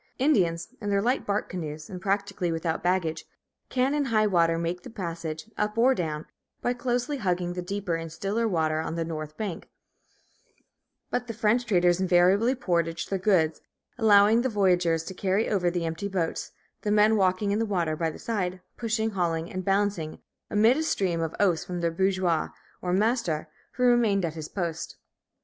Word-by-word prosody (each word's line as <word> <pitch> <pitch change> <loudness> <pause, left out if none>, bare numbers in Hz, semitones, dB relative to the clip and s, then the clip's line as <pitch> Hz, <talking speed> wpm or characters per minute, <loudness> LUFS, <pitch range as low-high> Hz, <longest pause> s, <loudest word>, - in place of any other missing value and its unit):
Indians, 180 - +2
in 205 - -3
their 200 0 +2
light 245 +6 0
bark 205 +1 0
canoes 155 -4 -6
and 180 -1 -8
practically 200 -2 -1
without 165 0 -2
baggage, 175 -3 0 0.5
can, 260 +2 +1
in 295 -1 +1
high 220 -4 +2
water, 170 -4 +3
make 170 +2 -2
the - - -10
passage, 165 -6 -5
up 210 +1 -1
or 250 +3 +5
down, 155 -7 -3 0.3
by 245 - 0
closely 245 +3 -1
hugging 180 -5 -1
the 180 - -4
deeper 190 0 -3
and 165 -1 -3
stiller 205 +7 -1
water 160 -5 +1
on 160 +1 -3
the 165 -1 -1
north 155 -2 -6
bank; 200 -6 -5 1.4
but 245 - -1
the 230 - -5
French 230 +2 +2
traders 175 -3 +3
invariably 190 +7 +4
portaged 170 -9 -1
their 195 - 0
goods, 170 -6 +2 0.3
allowing 215 0 +5
the 260 - 0
voyageurs 180 -6 +2
to 190 - -7
carry 195 +3 0
over 180 -4 +1
the 175 -1 -2
empty 165 +5 -3
boats, 180 -4 -2 0.3
the 210 - -2
men 210 +1 +5
walking 190 0 +2
in 205 - +1
the - - +2
water 170 -6 0
by 165 +1 -1
the 155 - -8
side, 185 -5 -2 0.2
pushing, 225 -1 -1
hauling, 170 -3 -1
and 185 0 -3
balancing, 195 -5 0 0.3
amid 220 +5 +4
a - - 0
stream 185 - 0
of 165 -1 -3
oaths 180 -5 +2
from 180 -1 -5
their 170 -1 0
bourgeois, 185 -2 +1 0.3
or 180 - -2
master, 205 -5 +1 0.2
who 250 - -2
remained 230 -6 +4
at 160 - -3
his 155 -2 -7
post. 170 -4 -4
185 Hz, 180 wpm, -27 LUFS, 165-215 Hz, 1.4 s, or